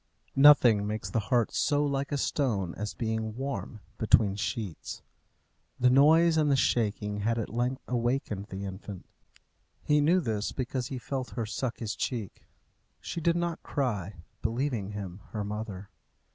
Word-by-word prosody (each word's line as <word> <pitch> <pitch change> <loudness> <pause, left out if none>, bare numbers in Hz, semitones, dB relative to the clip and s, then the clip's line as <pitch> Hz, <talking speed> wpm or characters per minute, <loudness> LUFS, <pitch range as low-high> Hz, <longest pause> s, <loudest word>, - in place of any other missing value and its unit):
Nothing 125 -7 +7
makes 110 +1 -4
the 115 - +1
heart 120 -3 +2
so 145 -1 +2
like 140 0 -1
a 145 - 0
stone 110 - 0
as 105 0 -5
being 110 -1 -2
warm 130 -4 -4 0.2
between 105 -3 +4
sheets. 105 - -4 0.8
The 125 0 +5
noise 160 +5 +6
and 150 -2 +3
the 140 - +4
shaking 105 -5 0
had 115 +3 0
at 110 -2 -3
length 125 +3 -1
awakened 120 -4 -1
the 95 +1 -5
infant. 95 0 -7 0.8
He 150 0 +3
knew 170 +5 +4
this 110 - -2
because 130 -1 -2
he 130 - -5
felt 125 -3 -4
her 115 - 0
suck 115 +3 -3
his 110 -3 -3
cheek. 115 -7 -4 0.5
She 170 - -5
did 170 +1 +2
not 170 -1 -2
cry, 105 - -2 0.3
believing 115 -4 -1
him 95 -2 -6
her 105 -2 -2
mother. 105 -2 -6
115 Hz, 155 wpm, -29 LUFS, 105-135 Hz, 0.8 s, Nothing